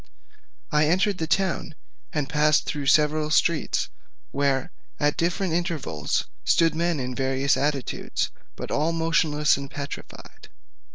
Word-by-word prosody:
I 150 Hz, 0 st, +3 dB
entered 185 Hz, +4 st, +2 dB
the 160 Hz, -, -1 dB
town 175 Hz, -2 st, 0 dB, 0.4 s
and 150 Hz, -3 st, -1 dB
passed 150 Hz, +1 st, +3 dB
through 145 Hz, -2 st, -3 dB
several 150 Hz, +1 st, +3 dB
streets, 155 Hz, 0 st, +1 dB, 0.4 s
where 140 Hz, +4 st, 0 dB, 0.3 s
at 145 Hz, 0 st, +2 dB
different 175 Hz, +1 st, 0 dB
intervals 160 Hz, -, -1 dB, 0.2 s
stood 165 Hz, -2 st, +3 dB
men 170 Hz, -1 st, 0 dB
in 125 Hz, -1 st, -3 dB
various 135 Hz, +2 st, +1 dB
attitudes, 140 Hz, 0 st, -2 dB, 0.2 s
but -, -, -6 dB
all 155 Hz, +3 st, +1 dB
motionless 160 Hz, -3 st, +2 dB
and 140 Hz, 0 st, -6 dB
petrified. 140 Hz, -1 st, -9 dB
150 Hz, 125 wpm, -25 LUFS, 140-165 Hz, 0.4 s, I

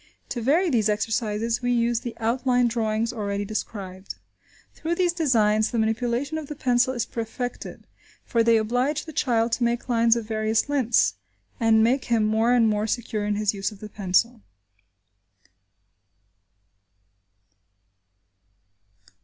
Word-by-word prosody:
To 240 Hz, -, -3 dB
vary 320 Hz, +9 st, +2 dB
these 220 Hz, -4 st, +2 dB
exercises, 225 Hz, +2 st, -1 dB
we 245 Hz, 0 st, 0 dB
use 235 Hz, -1 st, +1 dB
the 240 Hz, -1 st, -7 dB
outline 245 Hz, +2 st, +1 dB
drawings 225 Hz, 0 st, -1 dB
already 205 Hz, -2 st, -3 dB
described. 195 Hz, -3 st, -6 dB, 0.6 s
Through 330 Hz, +2 st, -3 dB
these 355 Hz, -1 st, +1 dB
designs, 220 Hz, -10 st, +2 dB
the 240 Hz, -, -3 dB
manipulation 240 Hz, +6 st, -1 dB
of 305 Hz, -, -8 dB
the 300 Hz, -, -6 dB
pencil 250 Hz, 0 st, +1 dB
is 240 Hz, -, -1 dB
perfected, 240 Hz, +2 st, -6 dB, 0.4 s
for 235 Hz, -, +1 dB
they 230 Hz, 0 st, +4 dB
oblige 250 Hz, +7 st, 0 dB
the 315 Hz, -, -9 dB
child 230 Hz, -4 st, +1 dB
to 240 Hz, -, 0 dB
make 235 Hz, 0 st, -1 dB
lines 230 Hz, -1 st, +4 dB
of 230 Hz, -2 st, -3 dB
various 220 Hz, +1 st, 0 dB
lengths, 270 Hz, -5 st, +2 dB, 0.5 s
and 225 Hz, -1 st, +4 dB
make 255 Hz, +4 st, +1 dB
him 230 Hz, -3 st, +1 dB
more 220 Hz, +2 st, +2 dB
and 240 Hz, -2 st, +4 dB
more 210 Hz, 0 st, 0 dB
secure 215 Hz, -2 st, -2 dB
in 210 Hz, -, 0 dB
his 210 Hz, 0 st, 0 dB
use 195 Hz, +1 st, -3 dB
of 205 Hz, -, -13 dB
the 215 Hz, -, -9 dB
pencil. 210 Hz, +4 st, 0 dB
230 Hz, 140 wpm, -24 LUFS, 215-245 Hz, 0.6 s, they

